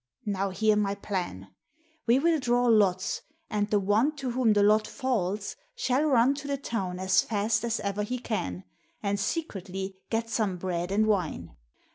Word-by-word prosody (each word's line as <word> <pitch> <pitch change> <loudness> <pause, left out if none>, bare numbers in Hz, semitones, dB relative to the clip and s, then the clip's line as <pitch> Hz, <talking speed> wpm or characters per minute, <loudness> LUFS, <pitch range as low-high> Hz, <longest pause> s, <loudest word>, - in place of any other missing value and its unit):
Now 200 -1 -1
hear 215 +3 +2
my 200 -1 +1
plan. 175 - -4 0.5
We 235 +2 +5
will 325 +3 +3
draw 245 -1 +2
lots, 200 -5 +3 0.3
and 210 0 0
the 210 - +3
one 215 +10 +2
to 270 -4 -3
whom 240 -3 +3
the 205 -1 +4
lot 215 +1 +4
falls 210 -6 -2 0.2
shall 260 - +1
run 260 -2 +4
to 285 0 -6
the 280 0 -1
town 195 -9 -3
as 190 0 +3
fast 215 +1 0
as 235 -1 0
ever 200 +1 -2
he 250 +5 -2
can 95 - -3 0.4
and 200 0 0
secretly 195 - -3
get 225 0 -1
some 215 -5 -1
bread 175 0 -2
and 210 +2 +3
wine. 170 - -1
210 Hz, 170 wpm, -28 LUFS, 190-235 Hz, 0.5 s, We